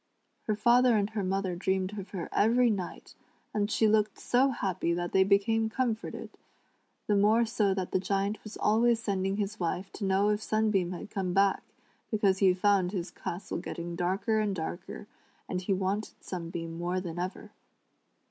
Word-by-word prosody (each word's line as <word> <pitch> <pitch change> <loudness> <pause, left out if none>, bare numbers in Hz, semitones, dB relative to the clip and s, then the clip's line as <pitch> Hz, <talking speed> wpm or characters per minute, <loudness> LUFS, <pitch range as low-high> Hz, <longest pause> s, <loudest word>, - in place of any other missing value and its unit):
Her 215 - +1
father 240 +2 +4
and 205 +1 0
her 215 -2 -2
mother 190 -1 -1
dreamed 190 +2 -1
of 195 0 -8
her 185 -4 -5
every 235 +3 +4
night, 190 -4 -5 0.4
and 205 -1 0
she 220 0 +3
looked 215 -1 +2
so 260 +3 +2
happy 185 -8 -1
that 175 0 -3
they 190 - +5
became 215 +3 +2
comforted, 230 -2 -3 0.7
the 210 - +2
more 215 +4 +4
so 210 -4 +1
that 185 -2 -3
the - - +2
Giant 200 +2 -1
was 215 - -9
always 230 +2 +3
sending 195 -3 -1
his 210 +1 -3
wife 180 +2 -2
to - - -7
know 195 +2 +3
if 210 0 0
Sunbeam 215 -5 +1
had 180 +4 -8
come 185 -3 -2
back, 195 +1 +3 0.5
because 200 -3 +2
he 190 -2 +5
found 185 -1 +2
his 175 -3 -3
castle 175 +3 -5
getting 170 0 -5
darker 190 +5 0
and 210 -2 0
darker, 175 +4 -6 0.4
and 180 - -2
he 185 - -3
wanted 195 +2 -1
Sunbeam 165 -2 -6
more 175 +2 -1
than 175 -2 -5
ever. 180 +2 -5
195 Hz, 175 wpm, -29 LUFS, 185-215 Hz, 0.7 s, they